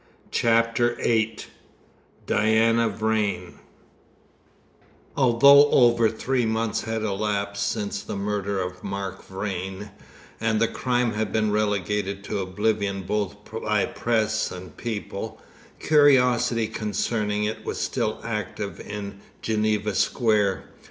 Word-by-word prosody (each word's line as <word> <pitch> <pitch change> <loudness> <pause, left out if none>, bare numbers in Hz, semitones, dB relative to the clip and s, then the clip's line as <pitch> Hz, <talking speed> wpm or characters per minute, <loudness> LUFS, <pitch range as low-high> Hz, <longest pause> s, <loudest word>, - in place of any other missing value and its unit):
CHAPTER 115 +1 +2
VIII 110 -2 0 0.8
DIANA 110 +2 +3
VRAIN 105 -5 -2 1.6
Although 140 +3 +6
over 120 -4 +4
three 125 +3 -1
months 110 0 -1
had 110 -1 -2
elapsed 100 -1 -1
since 100 -1 -3
the - - -6
murder 100 0 -2
of 90 0 -5
Mark 100 0 -5
Vrain, 95 +1 -5 0.5
and 110 -1 +1
the 115 - +3
crime 125 -1 0
had 105 0 -2
been 110 -1 +1
relegated 105 -1 -1
to 100 - -3
oblivion 100 +1 -1
both 105 +1 -2 0.3
by 105 -2 +1
press 110 -2 0
and 90 0 -9
people, 110 -1 -5 0.4
curiosity 125 -6 +4
concerning 105 -1 -1
it 105 +1 -3
was - - -4
still 110 - -1
active 105 -4 -4
in 100 -1 -7 0.2
Geneva 105 -1 0
Square. 105 0 +1
105 Hz, 110 wpm, -24 LUFS, 100-115 Hz, 1.6 s, Although